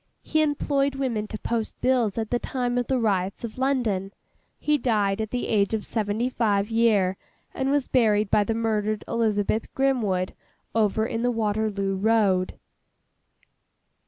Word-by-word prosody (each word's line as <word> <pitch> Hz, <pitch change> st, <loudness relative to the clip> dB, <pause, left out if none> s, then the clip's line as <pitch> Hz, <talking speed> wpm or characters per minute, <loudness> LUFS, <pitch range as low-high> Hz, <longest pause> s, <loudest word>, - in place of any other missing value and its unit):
He 315 Hz, -, +1 dB
employed 280 Hz, -2 st, +1 dB
women 240 Hz, -6 st, -2 dB
to 215 Hz, -, -6 dB
post 225 Hz, 0 st, -3 dB
bills 245 Hz, -5 st, +1 dB
at 220 Hz, -1 st, -2 dB
the 245 Hz, -, +1 dB
time 245 Hz, -1 st, -1 dB
of 245 Hz, -, -2 dB
the 265 Hz, -, +1 dB
riots 195 Hz, -4 st, 0 dB
of 230 Hz, +1 st, -6 dB
London. 235 Hz, -8 st, 0 dB, 0.5 s
He 300 Hz, -1 st, +1 dB
died 210 Hz, -4 st, +1 dB
at 220 Hz, -, -3 dB
the 245 Hz, +2 st, -2 dB
age 205 Hz, 0 st, +2 dB
of 215 Hz, -, -4 dB
seventy 220 Hz, +2 st, -1 dB
five 210 Hz, -4 st, 0 dB
year, 210 Hz, -5 st, +3 dB, 0.4 s
and 265 Hz, 0 st, -1 dB
was 285 Hz, -1 st, +1 dB
buried 215 Hz, -4 st, +2 dB
by 210 Hz, -, +4 dB
the 225 Hz, -, -1 dB
murdered 215 Hz, -2 st, -1 dB
Eliza 215 Hz, -3 st, +1 dB
Grimwood, 215 Hz, -4 st, 0 dB, 0.4 s
over 220 Hz, 0 st, +2 dB
in 230 Hz, -1 st, -3 dB
the 245 Hz, -, +2 dB
Waterloo 210 Hz, -3 st, 0 dB
Road. 200 Hz, -3 st, +2 dB
220 Hz, 155 wpm, -25 LUFS, 205-245 Hz, 0.5 s, by